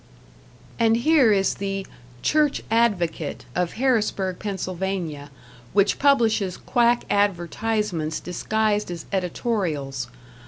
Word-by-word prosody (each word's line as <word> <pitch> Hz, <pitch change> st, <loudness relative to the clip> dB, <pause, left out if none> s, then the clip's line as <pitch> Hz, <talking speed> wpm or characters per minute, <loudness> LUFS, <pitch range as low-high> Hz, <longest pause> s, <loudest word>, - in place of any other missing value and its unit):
And 225 Hz, 0 st, +4 dB
here 275 Hz, -2 st, +4 dB
is 195 Hz, -2 st, +2 dB
the 195 Hz, -1 st, -3 dB, 0.4 s
"Church 300 Hz, -2 st, +2 dB
Advocate", 185 Hz, -10 st, 0 dB
of 180 Hz, -1 st, -1 dB
Harrisburg, 215 Hz, -7 st, 0 dB
Pa., 185 Hz, -6 st, -3 dB, 0.4 s
which 200 Hz, 0 st, +3 dB
publishes 225 Hz, -9 st, +3 dB
quack 240 Hz, -1 st, +2 dB
advertisements 200 Hz, -3 st, 0 dB
disguised 210 Hz, +3 st, -1 dB
as 170 Hz, -2 st, -6 dB
editorials. 170 Hz, -, -2 dB
200 Hz, 90 wpm, -24 LUFS, 175-225 Hz, 0.4 s, And